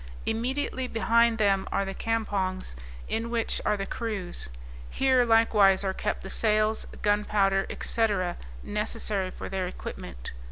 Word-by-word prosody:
Immediately 255 +3 -1
behind 230 0 +3
them 200 -3 +2
are 195 - +1
the 195 - -4
campongs, 195 - -2 0.3
in 225 +1 -2
which 235 -1 0
are 210 - +1
the 195 - -3
crews; 200 - -4 0.4
here 260 -2 +3
likewise 215 -4 +5
are 190 -1 0
kept - - -2
the 195 - -7
sails, 215 0 +2 0.2
gunpowder, 205 -2 +2
&c. 225 -1 +2 0.6
necessary 210 -2 -2
for - - -7
their 190 -1 -2
equipment. - - -7
210 Hz, 130 wpm, -27 LUFS, 195-225 Hz, 0.6 s, likewise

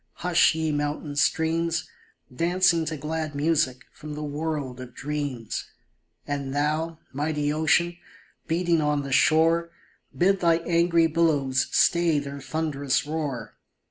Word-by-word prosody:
Hush, 175 -2 +4
ye 160 -1 -1
mountain 145 0 -3
streams. 165 +2 +1 0.5
Dancing 170 +1 +2
to 155 0 -3
glad 155 +1 -4
music 145 -4 +1
from 150 -1 -8
the 150 - -5
world 145 -3 -3
of 125 -1 -10
dreams! 145 -5 -4 0.6
And 140 -1 -3
thou, 155 +3 0 0.2
mighty 150 +1 -1
ocean, 170 +3 +2 0.5
beating 170 0 +1
on 150 -1 0
the 140 - -6
shore, 165 +4 +3 0.5
Bid 195 +2 +3
thy 170 -2 +4
angry 170 -1 +3
billows 150 -5 +1
stay 170 -3 +3
their 140 -1 -5
thunderous 145 -2 -1
roar 150 -5 -4
155 Hz, 125 wpm, -25 LUFS, 145-165 Hz, 0.6 s, Hush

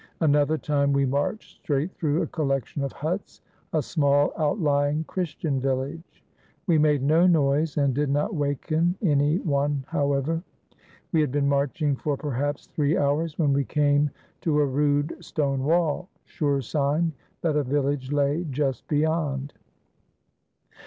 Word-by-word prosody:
Another 150 0 +3
time, 140 -2 +1
we 140 0 +2
marched 140 +11 -3
straight 145 +5 -1
through 155 0 0
a - - -1
collection 140 -2 -2
of 135 - -2
huts 170 +7 -4 0.2
— - - -38
a 155 -2 +1
small 145 -1 +2
outlying 150 -2 +1
Chris 175 0 -4
tian 140 -5 -1
village. 135 +5 -3 0.4
We 165 -5 +3
made 150 -3 +3
no 160 +5 +4
noise 150 -2 +2
and 140 -2 +2
did 145 +2 0
not 145 +9 0
waken 155 +3 0
any 145 -2 +3
one, 145 -4 0
however. 145 +3 0 0.7
We 160 - +3
had 150 - 0
been 140 0 +1
marching 140 +1 +1
for 145 +1 -2
perhaps 145 0 -2
three 150 0 0
hours, 150 +3 0
when 145 -4 +2
we 140 0 +2
came 145 +1 +2 0.3
to 155 -3 +1
a 145 - +4
rude 145 +4 0
stone 140 -5 -1
wall, 170 +3 +1 0.2
sure 145 -4 -1
sign 150 +6 0 0.3
that 160 -3 0
a 150 - +3
village 140 0 -1
lay 145 +4 +1
just 135 -1 -2
beyond. 150 -2 0
145 Hz, 150 wpm, -25 LUFS, 140-155 Hz, 0.7 s, no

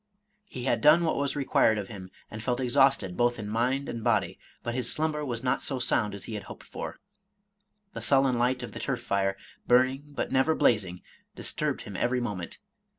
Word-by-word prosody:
He 130 -10 -7
had 130 - +1
done 155 +3 +6
what 160 - +1
was 140 0 -1
required 130 -5 +3
of 100 -2 -4
him, 95 -4 -9 0.2
and 110 - -6
felt 125 +2 -1
exhausted 125 -6 +3
both 120 +2 +2
in 105 - -6
mind 125 +6 0
and 115 - -5
body; 105 -7 +1 0.2
but 120 - -3
his 125 -1 0
slumber 155 -1 -1
was 120 -4 -4
not 125 - +1
so 135 - -1
sound 115 -4 +1
as 100 - -8
he 115 - -6
had 105 - -5
hoped - - -11
for. - - -7 1.0
The - - -6
sullen 135 -3 +3
light 125 +1 +1
of 120 - -6
the - - -8
turf - - -2
fire, 100 0 0 0.3
burning 130 +3 +3
but 145 - -4
never 135 +4 +3
blazing, 95 -6 +1 0.3
disturbed - - -1
him - - -9
every 125 +1 +1
moment. 100 -8 -4
120 Hz, 200 wpm, -28 LUFS, 105-135 Hz, 1.0 s, done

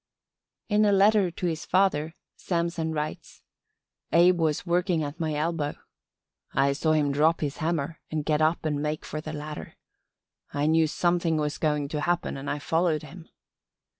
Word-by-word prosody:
In 210 0 +3
a 205 - +4
letter 200 -1 +4
to 175 +2 -5
his 165 -2 -2
father 170 -4 +1 0.2
Samson 170 -2 -2
writes: 150 -1 -5 0.7
"Abe 175 +1 +5
was 155 0 0
working 175 -1 +1
at 145 +3 -6
my 155 -2 -1
elbow. 155 -1 -1 0.8
I 140 +1 +3
saw 155 +2 +1
him 150 -2 +2
drop 155 +4 +2
his 145 -2 -2
hammer 160 -1 -2
and 155 -2 -3
get 155 -1 +1
up 160 +1 +1
and 150 -2 0
make 150 +1 -3
for 155 - -5
the 155 - -6
ladder. 150 0 -7 0.8
I 145 0 -1
knew 160 +1 +4
something 170 0 +1
was 150 0 -2
going 150 -2 0
to 150 -1 -3
happen 175 +2 0
and 135 +1 -5
I - - -1
followed 160 +1 0
him. 165 +2 -12
160 Hz, 165 wpm, -27 LUFS, 150-170 Hz, 0.8 s, Abe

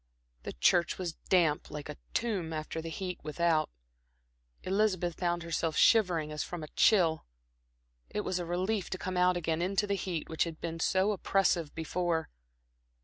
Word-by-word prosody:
The - - -6
church 170 - +3
was 175 -3 -3 0.2
damp 165 -5 +3
like 150 -1 -6
a 150 - -6 0.2
tomb 195 -9 -1
after 155 +1 -4
the 165 - -6
heat 180 +2 -4
without; 160 +1 +1 0.9
Elizabeth 185 -3 0
found 175 -1 0
herself 165 -1 -1
shivering 180 -9 +4
as 150 - -3
from 175 -3 -6
a 155 - -8
chill. 170 -7 +3 0.8
It 210 - -2
was 185 -3 -2
a - - -2
relief 185 +3 -1
to 190 - -3
come 185 0 -4
out 180 0 +3
again 165 -1 -1
into 195 +3 +1
the 200 - -1
heat 180 -4 -3
which 160 - 0
had 165 -2 -7
been 165 -1 -4
so 190 +5 +2
oppressive 190 -5 +1
before. 165 0 -1
175 Hz, 165 wpm, -31 LUFS, 160-185 Hz, 0.9 s, shivering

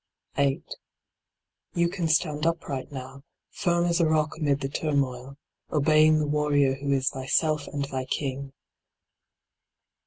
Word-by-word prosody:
8. 140 -1 +1 1.1
You 170 0 +3
can 170 -1 -2
stand 155 -1 +1
upright 145 -4 -3
now, 130 0 -8 0.3
firm 175 -3 +1
as 170 0 +1
a 170 - +4
rock 155 -1 +1
amid 145 -3 0
the 135 - -1
turmoil, 140 -3 -2 0.3
obeying 155 +1 +5
the 155 - +1
warrior 145 -2 +2
who 140 +1 -3
is 135 -1 +2
thyself 145 +3 0
and 140 -1 -3
thy 130 -2 -4
king. 135 0 -3
145 Hz, 130 wpm, -26 LUFS, 135-155 Hz, 1.1 s, obeying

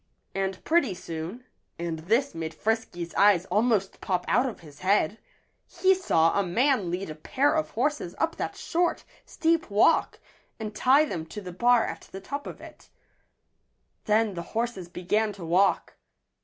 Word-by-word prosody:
And 195 -1 -3
pretty 310 - +2
soon 175 +8 -7 0.3
and 170 -1 -3
this 230 - +1
made 160 -1 -5
Frisky's 205 -5 -2
eyes 200 -3 +4
almost 210 -3 +1
pop 180 -3 -1
out 255 +2 +3
of 230 - -10
his 150 -3 -14
head 200 +1 +1 0.5
he 375 +2 +3
saw 165 - +2
a 200 - +2
man 225 +1 +1
lead 180 -1 -3
a - - -4
pair 265 - +1
of 315 -1 0
horses 260 - -1
up 330 - 0
that - - -3
short, 345 0 -1 0.2
steep 325 -3 0
walk 210 +11 +3 0.4
and 215 -1 -5
tie 270 +7 +5
them 165 - -5
to 210 - -7
the 180 -3 -8
bar 240 +5 +4
at - - -7
the 190 - -7
top 280 +9 -6
of - - -8
it. - - -14 1.2
Then 215 0 +2
the 170 - -4 0.2
horses 230 -7 -2
began 210 +5 0
to 190 -4 -9
walk. 180 +4 +2
205 Hz, 165 wpm, -27 LUFS, 175-250 Hz, 1.2 s, tie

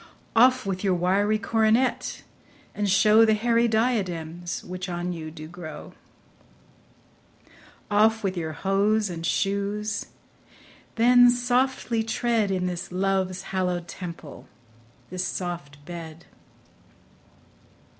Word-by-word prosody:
Off 255 +1 +5
with 190 -1 -3
your 190 -2 +2
wiry 195 +5 +2
coronet, 225 +3 +1 0.5
and 205 -1 -1
show 210 +3 +5
The 220 -1 +4
hairy 235 +2 +2
diadems 180 -8 -1
which 180 +1 -6
on 175 +1 -3
you 160 -2 -6
do 155 -1 -10
grow. 165 -2 -9 2.0
Off 220 +2 +3
with 190 -1 -1
your 160 -3 -3
hose 200 +3 +1
and 165 -1 -6
shoes; 200 +3 -1 0.9
then 245 +1 +6
softly 245 -1 +1
tread 225 -1 0
In 185 -1 -1
this 180 -1 -4
love's 185 0 -1
hallow'd 180 -2 -1
temple, 170 -6 -9 0.6
this 185 0 -2
soft 145 -6 -6
bed. 165 -2 -9
195 Hz, 105 wpm, -25 LUFS, 175-220 Hz, 2.0 s, then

